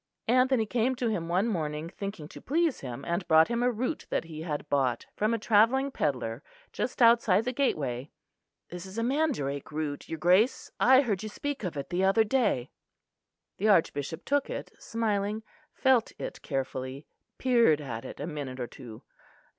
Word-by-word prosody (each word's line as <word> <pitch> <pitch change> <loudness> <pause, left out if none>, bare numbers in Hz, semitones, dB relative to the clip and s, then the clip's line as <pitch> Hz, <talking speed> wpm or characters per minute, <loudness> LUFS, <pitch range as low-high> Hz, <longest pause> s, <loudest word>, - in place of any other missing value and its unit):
Anthony 255 -1 +3
came 245 +4 0
to 245 -2 -1
him 170 -6 -2
one 185 +6 +2
morning, 155 -6 -2
thinking 195 -3 -6
to - - -11
please 325 +1 +1
him, 125 0 -7
and 170 +2 -2
brought 160 -1 +6
him 235 0 0
a 245 - +3
root 250 +6 -3
that - - 0
he 160 -2 -8
had 150 -2 -4
bought 130 -5 0
from 215 +2 +1
a 230 - +1
travelling 230 +6 +3
pedlar 125 - -2 0.3
just 250 0 -1
outside 225 -3 +5
the 250 - -1
gateway. 145 - -1 0.6
"This 180 +1 -7
is 190 +3 -10
a 230 - 0
mandrake 240 - -1
root, 150 -1 -4
your 160 - -3
Grace; 185 - +3
I 260 +1 +7
heard 210 -8 -1
you 215 - -5
speak 285 +4 -4
of 175 -5 -3
it 140 - -5
the 180 +2 +1
other 195 +4 +4
day." 215 - 0 0.9
The 210 - +1
Archbishop 160 -3 +1
took 285 0 +1
it, - - -5
smiling, 215 -1 -1 0.3
felt 260 -4 +2
it - - -6
carefully, 135 0 -4 0.3
peered 235 - +4
at 120 -6 -6
it - - -9
a 145 - -3
minute 145 -5 -5
or 125 - -2
two. 120 -3 -11
195 Hz, 180 wpm, -29 LUFS, 150-235 Hz, 0.9 s, I